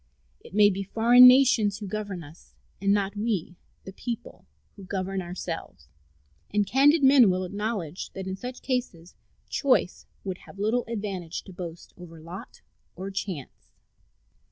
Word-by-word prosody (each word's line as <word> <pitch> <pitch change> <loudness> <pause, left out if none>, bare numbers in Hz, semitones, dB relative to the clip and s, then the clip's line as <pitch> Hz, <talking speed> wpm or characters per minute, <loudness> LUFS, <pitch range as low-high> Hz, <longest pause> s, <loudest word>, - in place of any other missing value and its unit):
It - - -13
may 205 -1 +6
be 195 +1 -3
foreign 235 +5 +7
nations 250 -6 +5
who 210 - -7
govern 200 -3 -5
us, 155 +3 -16 0.3
and 200 0 +2
not 200 0 +1
we, 205 -5 -2 0.3
the 190 - -10
people, 235 +3 -7 0.3
who 200 - -12
govern 190 0 -3
ourselves; 170 - -7 0.6
and 205 0 +2
candid 285 - +4
men 265 -5 +7
will 185 0 0
acknowledge 200 -3 -4
that 190 -1 -6
in 190 0 -4
such 250 +6 -8
cases 240 -10 -3 0.3
choice 260 - +1 0.2
would 190 -2 -5
have - - -13
little 220 +5 0
advantage 195 -7 -4
to 190 - -12
boast 175 -2 -8
of - - -14
over 165 -2 -11
lot 170 +4 -10 0.3
or 190 +2 -6
chance. 190 -8 -6
195 Hz, 155 wpm, -26 LUFS, 180-225 Hz, 0.6 s, foreign